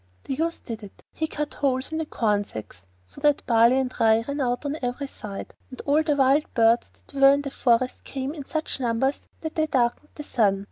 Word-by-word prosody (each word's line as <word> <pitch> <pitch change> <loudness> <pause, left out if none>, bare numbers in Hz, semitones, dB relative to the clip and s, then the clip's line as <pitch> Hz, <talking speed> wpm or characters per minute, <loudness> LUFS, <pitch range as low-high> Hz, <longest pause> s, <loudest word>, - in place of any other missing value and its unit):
The - - -3
youth 330 +4 -2
did 225 -2 -6
it. 205 -2 -13
He 315 - -2
cut 300 -1 -4
holes 265 0 -1
in 315 - -2
the 320 - -3
corn 210 -6 +1
sacks 100 - -10 0.2
so 90 - -13
that 295 -1 +2
barley 235 +2 +5
and 260 -1 -1
rye 225 0 +4
ran 285 +1 -2
out 245 +2 -1
on 285 +1 -1
every 250 +3 -2
side, 210 -7 -8 0.2
and 255 - -10
all 295 +2 +3
the 310 -2 +1
wild 275 +2 +3
birds 230 0 +4
that - - -25
were 275 0 +7
in 285 0 0
the 275 - -5
forest 250 -1 +1
came 270 +1 -4
in 300 -3 -7
such 310 -2 -3
numbers 250 +3 0
that 315 -1 -4
they 315 0 +1
darkened 260 +1 0
the 300 - -7
sun. 205 -8 +2
265 Hz, 225 wpm, -25 LUFS, 230-290 Hz, 0.2 s, were